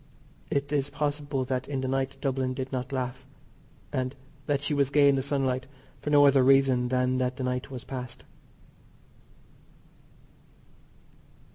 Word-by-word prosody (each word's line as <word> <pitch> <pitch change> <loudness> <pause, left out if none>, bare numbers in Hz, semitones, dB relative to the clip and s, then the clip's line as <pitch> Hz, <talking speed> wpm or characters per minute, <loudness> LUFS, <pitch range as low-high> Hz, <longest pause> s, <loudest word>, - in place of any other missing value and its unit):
It 140 0 -1
is 145 -2 0
possible 145 -2 -2
that 130 0 -2
in 135 -2 -2
the 130 - -2
night 135 +1 -1
Dublin 130 -2 -1
did 130 0 -4
not 130 0 -3
laugh, 130 0 -4 0.7
and 130 +1 -2 0.3
that 145 -1 0
she 145 - 0
was 140 -2 +2
gay 145 0 +5
in 140 - +5
the 135 - 0
sunlight 130 -2 -1 0.3
for - - -4
no 145 -1 +6
other 140 -1 +6
reason 130 -2 +4
than 130 0 +1
that 125 0 -1
the 130 - -3
night 125 0 -2
was 130 -2 -7
past. 125 -2 -7
135 Hz, 150 wpm, -28 LUFS, 130-140 Hz, 0.7 s, no